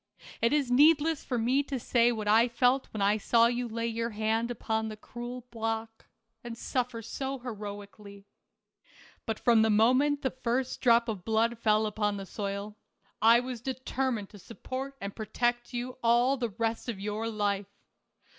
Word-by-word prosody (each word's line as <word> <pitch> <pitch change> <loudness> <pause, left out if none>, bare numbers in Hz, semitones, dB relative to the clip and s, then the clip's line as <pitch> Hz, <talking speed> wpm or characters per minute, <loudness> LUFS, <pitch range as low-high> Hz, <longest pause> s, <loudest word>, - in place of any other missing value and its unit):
It 230 - +3
is 285 -4 +1
needless 305 +3 +4
for 250 - -2
me 250 +5 +2
to 275 -2 -4
say 235 0 +3
what 215 -3 -4
I 225 +3 +5
felt 245 +2 +2
when 210 -2 -3
I 205 +2 +3
saw 230 +2 +4
you 240 +1 0
lay 230 0 -3
your 230 0 -2
hand 220 +2 -1
upon 220 -2 -2
the 215 -1 -7
cruel 240 +3 -8
block, 225 -1 -4 0.4
and 235 -1 -7
suffer 245 -2 -2
so 270 +4 -4
heroically. 205 -4 -8 1.0
But 220 -1 -2
from 235 -3 +4
the 220 - +3
moment 255 +7 +3
the 265 - 0
first 255 0 -2
drop 235 -1 +4
of 210 -6 -4
blood 225 +2 +1
fell 215 -1 +3
upon 210 -1 -1
the 195 - -6
soil, 200 +1 -5 0.4
I 230 +2 +6
was 250 -2 -6
determined 260 -4 -2
to 205 - -13
support 260 +6 -7
and 200 0 -6
protect 240 +2 -1
you 250 +1 -5
all 240 +3 +4
the 245 -3 -2
rest 225 +3 -3
of 215 -5 -4
your 210 +3 -3
life. 205 -2 -1
230 Hz, 170 wpm, -29 LUFS, 215-250 Hz, 1.0 s, I